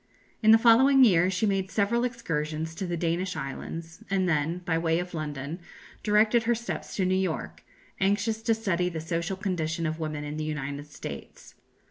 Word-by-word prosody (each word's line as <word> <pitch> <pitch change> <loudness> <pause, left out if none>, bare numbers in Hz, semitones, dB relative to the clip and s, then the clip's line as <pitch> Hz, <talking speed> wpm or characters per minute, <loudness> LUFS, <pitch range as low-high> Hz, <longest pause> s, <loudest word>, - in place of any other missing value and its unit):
In 220 - +4
the 225 - +9
following 260 +4 +6
year 180 -6 +5
she 190 +3 0
made 195 -2 0
several 220 +4 +1
excursions 160 -9 -3
to 190 +2 -4
the 175 -1 -2
Danish 175 +3 -1
islands, 165 +5 -6
and 190 -1 +1
then, 165 +2 0
by 165 - +1
way 165 0 +1
of 180 +1 -4
London, 150 0 -4 0.4
directed 215 +2 +4
her 235 0 +3
steps 235 +1 -5
to 190 - +1
New 185 - +2
York, 185 -3 -2 0.4
anxious 205 +3 +1
to 225 0 +2
study 180 -5 0
the 165 -2 -5
social 170 +3 -2
condition 170 -4 -2
of 160 +1 -2
women 155 -2 -3
in 150 +1 -5
the 155 - -2
United 145 -1 -4
States. 145 - -9
180 Hz, 180 wpm, -27 LUFS, 160-210 Hz, 0.4 s, the